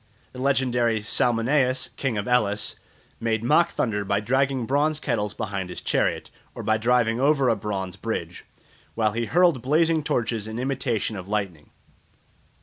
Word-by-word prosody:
The 125 - -8
legendary 125 -4 +1
Salmoneus, 125 +4 +1
King 130 -5 -2
of 100 - -3
Elis, 105 -4 +1 0.4
made 115 -1 -1
mock 155 +7 +4
thunder 105 -4 -1
by 100 +1 0
dragging 130 +3 0
bronze 150 +4 +1
kettles 105 -7 -2
behind 100 -4 -4
his - - -6
chariot, - - -1 0.2
or - - -6
by 110 0 +2
driving 115 0 +2
over 140 -1 +3
a 115 - +3
bronze 95 -4 -4
bridge, - - -4 0.5
while 110 -2 +2
he 115 +1 -2
hurled 175 -7 +3
blazing 160 +4 +2
torches 115 -6 -1
in 110 +1 -6
imitation 125 -4 -1
of 95 -2 -7
lightning. 95 -8 -3
115 Hz, 150 wpm, -24 LUFS, 105-135 Hz, 0.5 s, mock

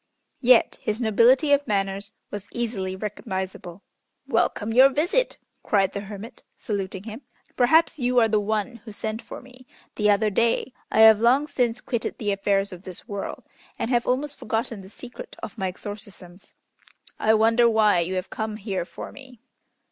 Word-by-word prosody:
Yet 250 -2 +4
his 215 +1 -2
nobility 245 +6 +4
of 285 0 +2
manners 195 0 -1 0.2
was 205 -1 -6
easily 210 -6 -3
recognizable. 190 -3 -5 0.4
"Welcome 225 +1 0
your 260 +3 +8
visit!" 350 - 0 0.2
cried 195 -2 +1
the - - -3
hermit, 210 +4 -9 0.2
saluting 195 -2 -4
him. 225 +3 -8 0.3
"Perhaps 315 +5 +3
you 250 0 0
are 230 -2 +6
the 215 -1 +2
one 215 +3 -2
who 225 0 -12
sent 220 +2 -4
for - - -10
me 255 0 -16 0.3
the 210 -1 +2
other 210 +1 +3
day? 230 +4 +1 0.2
I 220 - +4
have 220 -1 +8
long 255 +5 +4
since 245 -5 -1
quitted 235 -3 -3
the 205 -2 -1
affairs 195 0 0
of 180 - -10
this 185 +3 -10
world, 200 -3 -5 0.3
and 235 - -2
have 240 -1 +1
almost 280 +3 -1
forgotten 225 -1 -3
the 190 - -13
secret 245 +4 -10
of 210 - -6
my 190 - 0
exorcisms. 195 -1 -9 0.7
I 220 +1 +4
wonder 230 +2 +4
why 215 -4 +4
you 175 +2 -1
have 185 +1 -4
come 220 -1 -3
here 195 -4 -3
for - - -9
me." 260 -4 -14
220 Hz, 170 wpm, -24 LUFS, 200-245 Hz, 0.7 s, your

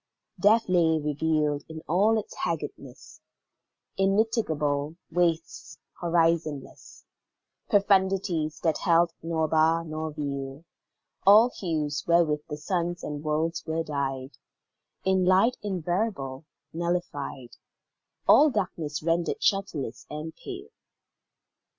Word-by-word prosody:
Death 220 +3 +4
lay 165 -3 +3
revealed 150 0 0
in 160 0 -8
all 205 +7 +3
its 215 - -5
haggardness - - -5 0.8
Immitigable 180 -8 +1 0.2
wastes 165 -1 -1 0.2
horizonless; 165 -4 -1 0.6
Profundities 190 -6 +2
that 160 -2 +1
held 170 -1 +3
nor 160 -1 -1
bar 160 +1 +2
nor 155 0 -4
veil; 140 0 -5 0.6
All 220 +5 +7
hues 155 -7 -2
wherewith 165 -3 +3
the 150 - -4
suns 175 +2 -2
and 150 0 -5
worlds 155 +2 -1
were 160 +1 -1
dyed 135 -3 -4 0.7
In 190 -1 +3
light 190 +7 +4
invariable 175 -7 -2 0.3
nullified; 160 -7 -3 0.7
All 305 - +7
darkness 165 - -3
rendered 170 +1 0
shelterless 160 - -1
and 155 +2 -6
pale. 395 +2 -8
165 Hz, 100 wpm, -27 LUFS, 150-185 Hz, 0.8 s, All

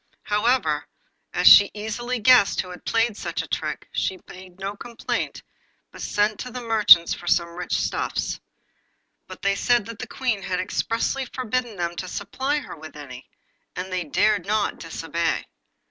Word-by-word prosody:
However, 210 - +1 0.4
as - - -1
she 200 -1 +10
easily 240 +4 -3
guessed 240 -2 +5
who 180 - -10
had 180 - -11
played 230 +1 +3
her - - -11
such - - -4
a - - -10
trick, - - -3
she 190 -1 -2
made 185 -1 -12
no 195 +1 -4
complaint, 235 +2 -4 0.5
but - - -11
sent 210 0 0
to 250 - -5
the 250 - -6
merchants 215 -7 +6
for 175 - -9
some 170 -1 +2
rich 175 +1 -5
stuffs. - - -2 0.9
But - - -11
they 200 - +3
said 240 +2 +2
that 230 0 -9
the 250 - -5
Queen 240 -5 -2
had 180 -1 -2
expressly 230 +7 -1
forbidden 250 -2 -3
them 175 -2 -3
to 185 - -4
supply 260 +10 -2
her 295 - -6
with 155 -1 -11
any, 130 -3 -10 0.5
and 185 +1 -5
they 180 -1 -1
dared 190 +5 +1
not 215 0 0
disobey. - - -2
205 Hz, 170 wpm, -24 LUFS, 180-235 Hz, 0.9 s, she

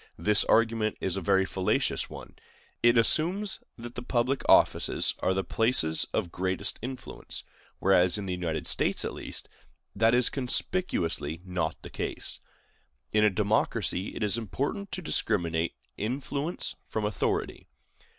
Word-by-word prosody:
This 105 +4 +5
argument 115 -1 +2
is 95 - -1
a 95 - -2
very 95 +2 +3
fallacious 95 -1 0
one. - - -10 0.5
It 120 0 +5
assumes 175 - +1 0.2
that 120 0 -8
the 120 - -5
public 125 +2 0
offices - - +4
are 95 +1 +1
the 95 - 0
places 110 -5 +2
of 85 - -1
greatest 95 0 -2
influence; 130 +2 -7 0.3
whereas, 90 -1 +4
in 105 - -4
the 90 - -2
United 85 -4 -2
States, - - +1
at - - -3
least, - - -7 0.5
that 115 +3 +4
is 125 -1 +3
conspicuously 120 - 0
not 90 -2 -2
the - - -9
case. - - -3 0.7
In 105 0 +4
a 105 - +6
democracy, 100 -1 0
it - - -2
is 105 +2 +1
important 140 - -3
to 185 - -4
discriminate 85 - 0 0.2
influence 140 - -2
from 110 -1 -2
authority. 105 - -1
105 Hz, 140 wpm, -28 LUFS, 95-125 Hz, 0.7 s, a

